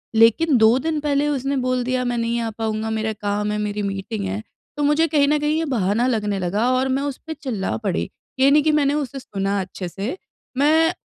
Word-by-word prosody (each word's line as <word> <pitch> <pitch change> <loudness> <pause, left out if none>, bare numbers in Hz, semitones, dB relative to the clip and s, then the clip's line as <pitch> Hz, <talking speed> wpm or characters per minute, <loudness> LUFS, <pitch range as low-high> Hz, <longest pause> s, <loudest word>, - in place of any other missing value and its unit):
लेकिन 235 +6 +5
2 220 +3 +5
दिन 310 +1 -1
पहले 290 0 +1
उसने 275 0 -1
बोल 255 -1 0
दिया, 255 0 0
"मैं 245 -1 -1
नहीं 230 +1 0
आ 225 - -2
पाऊँगा 220 0 -3
मेरा 220 0 -1
काम 205 0 -2
है 210 - -1
मेरी 210 0 -2
मीटिंग 195 +1 -3
है" 200 +3 -3 0.4
तो 295 - 0
मुझे 295 +3 +3
कहीं 285 -2 +3
न 300 +1 +3
कहीं 300 +1 +1
ये 325 - 0
बहाना 215 +3 +1
लगने 210 -5 0
लगा 205 +7 0
और 260 +1 +1
मैं 270 +1 +1
उस 285 -2 -3
पे 320 - -3
चिल्ला 255 -10 -3
पड़ी। 195 - -1 0.3
ये 270 +1 +6
नहीं 295 0 +5
कि 310 - +3
मैंने 290 -1 +2
उसे 280 -2 -3
सुना 200 -3 -2
अच्छे 185 0 -6
से 215 - -4 0.4
मैं 320 +4 +4
245 Hz, 220 wpm, -22 LUFS, 210-285 Hz, 0.4 s, ये